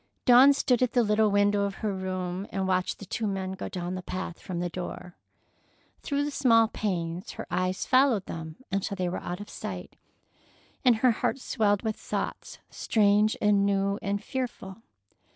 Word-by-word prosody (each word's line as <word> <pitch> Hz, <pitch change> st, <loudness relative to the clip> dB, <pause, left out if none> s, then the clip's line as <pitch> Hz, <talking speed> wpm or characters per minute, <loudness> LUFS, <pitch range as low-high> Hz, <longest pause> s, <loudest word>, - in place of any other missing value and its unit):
Dawn 255 Hz, +3 st, +8 dB
stood 255 Hz, -3 st, +1 dB
at 250 Hz, -2 st, +1 dB
the 245 Hz, -, +4 dB
little 210 Hz, 0 st, +3 dB
window 205 Hz, 0 st, +3 dB
of 200 Hz, -1 st, -1 dB
her 205 Hz, -, 0 dB
room 185 Hz, 0 st, -4 dB
and 190 Hz, -1 st, -1 dB
watched 185 Hz, -1 st, 0 dB
the 200 Hz, -, -10 dB
two 215 Hz, +4 st, -2 dB
men 190 Hz, -1 st, -2 dB
go 190 Hz, -, -5 dB
down 180 Hz, -1 st, -4 dB
the 185 Hz, -, -4 dB
path 180 Hz, -1 st, -5 dB
from 180 Hz, -2 st, -5 dB
the 175 Hz, -, -1 dB
door. 180 Hz, 0 st, -7 dB, 0.9 s
Through 285 Hz, 0 st, -1 dB
the 295 Hz, -, -3 dB
small 230 Hz, -5 st, +4 dB
panes 180 Hz, -3 st, -3 dB
her -, -, -7 dB
eyes 185 Hz, +1 st, -1 dB
followed 255 Hz, -6 st, +3 dB
them 160 Hz, -1 st, -7 dB, 0.2 s
until 195 Hz, +1 st, -1 dB
they 185 Hz, -2 st, -1 dB
were 175 Hz, -, -4 dB
out 175 Hz, +1 st, -5 dB
of 205 Hz, -, -8 dB
sight, -, -, -7 dB, 0.9 s
and 250 Hz, -3 st, +5 dB
her 245 Hz, +3 st, +4 dB
heart 230 Hz, -, -1 dB
swelled 210 Hz, -6 st, 0 dB
with 220 Hz, -1 st, -2 dB
thoughts -, -, -4 dB
strange 210 Hz, 0 st, +2 dB
and 205 Hz, -1 st, +4 dB
new 200 Hz, 0 st, +1 dB
and 200 Hz, +1 st, -2 dB
fearful. 225 Hz, -6 st, -5 dB
200 Hz, 180 wpm, -27 LUFS, 185-225 Hz, 0.9 s, Dawn